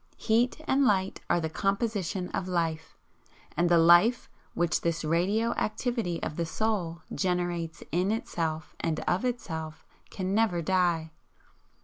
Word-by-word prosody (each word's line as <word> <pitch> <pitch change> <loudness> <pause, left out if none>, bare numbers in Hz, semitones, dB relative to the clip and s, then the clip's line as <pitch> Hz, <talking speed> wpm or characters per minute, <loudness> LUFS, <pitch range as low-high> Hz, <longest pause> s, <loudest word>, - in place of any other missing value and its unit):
Heat 235 +5 +1
and 275 +1 +3
Light 195 -6 +1
are - - +3
the 160 - -1
composition 195 0 -1
of 185 - -3
Life; 165 -3 -2 0.6
and 175 0 +2
the 170 - +5
Life 175 +9 +5 0.3
which 175 -1 +1
this 170 -1 -1
radio 195 +9 +1
activity 215 -5 -2
of 155 +2 -3
Soul 180 -5 -2
generates 175 -3 -2
IN 180 +5 +1
itself 160 -8 -3
and 160 -1 -1
OF 180 +7 0
itself, 160 -10 -4 0.2
can 190 0 -3
never 210 -5 +2
die. 170 -3 +1
180 Hz, 130 wpm, -28 LUFS, 165-215 Hz, 0.6 s, the